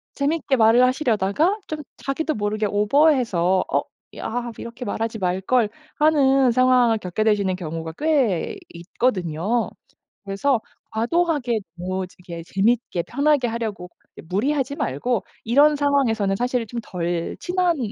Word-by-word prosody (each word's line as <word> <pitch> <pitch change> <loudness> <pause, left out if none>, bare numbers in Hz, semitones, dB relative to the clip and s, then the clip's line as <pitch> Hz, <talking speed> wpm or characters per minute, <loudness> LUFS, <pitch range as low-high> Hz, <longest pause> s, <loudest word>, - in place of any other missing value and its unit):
재밌게 290 0 0
말을 225 +2 +5
하시려다가 255 - +2
좀 310 -1 -4 0.2
자기도 310 +3 -2
모르게 215 -1 -1
오버해서 210 - +3
'어 - - +2 0.4
아 240 +1 -3
이렇게 235 +2 -8
말하지 225 +1 -3
말걸.' 190 +5 +1 0.3
하는 275 -4 +4
상황을 250 -2 +4
겪게 185 +3 -2
되시는 205 -4 +2
경우가 165 -2 -5
꽤 275 - +1 0.2
있거든요. 185 +2 -1 0.6
그래서 225 +6 +1 0.3
과도하게 250 0 0 0.2
뭐지게 180 -1 -6
재미있게 200 -2 0
편하게 285 - +1
하려고 220 -6 -4 0.3
예 - - -8
무리하지 265 - -1
말고 210 - -1 0.2
이런 290 +6 +5
상황에서는 240 -9 +1
사실 245 0 -1
좀 235 +2 -5
덜 175 -3 -3
친한 360 -2 0
230 Hz, 300 characters per minute, -22 LUFS, 190-275 Hz, 0.6 s, 말을